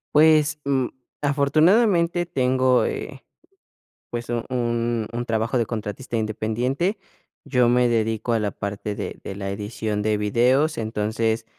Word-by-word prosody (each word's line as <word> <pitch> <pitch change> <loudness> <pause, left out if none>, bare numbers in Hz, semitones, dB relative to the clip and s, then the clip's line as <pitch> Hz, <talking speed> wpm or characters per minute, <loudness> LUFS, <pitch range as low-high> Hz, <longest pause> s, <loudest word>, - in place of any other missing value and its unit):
Pues, 150 -1 +5
mm, 135 -3 +1 0.3
afortunadamente 170 +5 +3
tengo, 130 -5 +2
eh, 135 -2 -5 0.9
pues, 120 0 -5
u 120 -1 0
un 120 -2 -1
un 120 +1 -3
trabajo 115 +2 0
de 115 - +1
contratista 115 +2 -5
independiente. 120 - -1 0.5
Yo 125 -4 +2
me 125 0 +3
dedico 115 0 0
a 115 - +2
la 105 -2 -1
parte 100 +1 -4
de - - -6
de 95 - -7
la 100 -1 -4
edición 105 +1 -3
de 105 0 +1
videos, 125 +9 +2
entonces, 110 +1 -1
120 Hz, 135 wpm, -23 LUFS, 110-140 Hz, 0.9 s, Pues